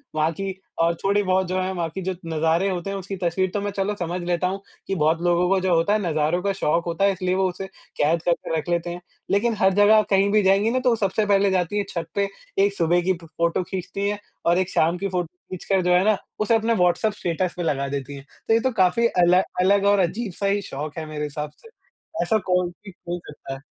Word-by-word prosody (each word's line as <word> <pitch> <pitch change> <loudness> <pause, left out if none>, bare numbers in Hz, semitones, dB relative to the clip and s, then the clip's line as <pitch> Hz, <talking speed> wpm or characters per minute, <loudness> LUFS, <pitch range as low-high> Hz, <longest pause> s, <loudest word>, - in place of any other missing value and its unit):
वहाँ 155 +1 +2
की 190 +3 -4 0.2
और, 165 +1 +3
थोड़ी-बहुत 190 -2 +2
जो 185 +1 -1
है 185 +1 -2
वहाँ 170 -3 -2
की 190 +4 -6
जो 185 0 -2
नजारे 165 +3 +1
होते 180 0 -3
हैं, 195 - -3
उसकी 195 +1 -6
तस्वीर 185 +1 0
तो 205 - -1
मैं 205 0 -2
चलो 200 +2 0
समझ 175 +1 -3
लेता 175 +1 0
हूँ, 195 +2 -4 0.3
कि 195 - -1
बहुत 160 0 +1
लोगों 175 0 +2
को 195 0 +3
जो 185 -1 +1
होता 165 +5 +2
है 215 - +2
नजारों 155 +3 +1
का 200 0 +1
शौक 170 -2 0
होता 170 +3 0
है 200 - +4
इसलिए 185 -1 -1
वो 190 0 +2
उसे 185 +2 -6 0.3
कैद 160 +3 +2
करके 170 -1 0
रख 160 - -4
लेते 175 0 0
हैं। 175 +1 -6 0.3
लेकिन 225 +4 +2
हर 190 0 +4
जगह 205 +2 +6
कहीं 195 0 +3
भी 215 0 +4
जाएँगी 195 +3 +3
ना 255 - +1
तो 255 0 +2
वो 235 - +3
सबसे 210 0 0
पहले 200 -1 +3
जाती 185 +2 0
है 205 - +1
छत 170 -2 -4
पे, 200 0 +1 0.3
1 200 0 +3
सुबह 175 -1 +2
की 185 +2 +1
फ - - -12
फ़ोटो 170 +2 -1
खींचती 190 +2 -4
हैं 205 0 -3 0.3
और 170 +1 +4
एक 185 -1 0
शाम 165 +1 +2
की 200 +2 -2
फ़ोटो 180 -2 -2 0.2
खींच 185 - -7
कर 195 -1 +2
जो 180 0 +3
है 180 +1 +4
ना, 215 -1 +3 0.2
उसे 215 +2 +3
अपने 225 +1 +1
व्हाट्सएप 180 +3 +2
स्टेटस 175 0 -2
पे 175 - -2
लगा 140 -4 0
देती 140 0 -5
है। 135 - -10 0.2
तो - - +3
ये 225 - +5
तो 260 +3 0
काफ़ी 185 +6 +4
अल 180 -5 +3 0.3
अलग 200 +2 +3
और 200 0 +4
अजीब 190 +4 -1
सा 200 - -4
ही 200 +1 +1
शौक 150 -3 -6
है 160 - -4
मेरे 155 -1 -5
हिसाब 150 0 -4
से, 455 - -17 0.5
ऐसा 220 - +2
कोई 180 -1 +2
भी 195 +3 -13 0.2
हो 175 0 -2
सकता 150 -2 -8
है। 135 - -8
185 Hz, 255 wpm, -23 LUFS, 170-200 Hz, 0.5 s, जगह